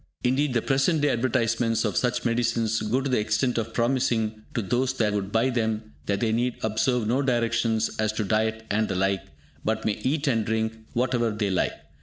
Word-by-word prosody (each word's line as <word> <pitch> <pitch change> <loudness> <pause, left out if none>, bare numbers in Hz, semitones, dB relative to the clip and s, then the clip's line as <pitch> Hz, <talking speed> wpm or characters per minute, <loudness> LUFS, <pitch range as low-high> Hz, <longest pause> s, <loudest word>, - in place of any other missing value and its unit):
Indeed 130 +1 +1
the 115 - +2
present 140 +4 +2
day 145 - +3
advertisments 115 -1 +1
of 105 -4 -1
such 125 -1 0
medicines 115 -2 +1
go 115 +5 0
to 135 - -2
the 125 - +3
extent 115 +4 +1
of 115 - -4
promising 115 -3 0
to 115 - 0
those 125 +6 0
that 110 -5 0
would 100 -1 -2
buy 115 +4 +2
them 110 -2 -2
that 100 -1 0
they 115 - +2
need 120 +2 0
observe 110 +2 +1
no 125 +5 +2
directions 115 -3 +1
as 110 -1 +2
to 110 - -1
diet 110 +2 0
and 110 +1 +1
the 95 - -2
like, 95 +1 +1 0.4
but 110 0 -1
may 105 - 0
eat 140 +4 0
and 115 -5 +2
drink 110 +1 -1 0.2
whatever 120 -1 +1
they 105 -2 -1
like. 95 - +1
115 Hz, 200 wpm, -26 LUFS, 110-125 Hz, 0.4 s, day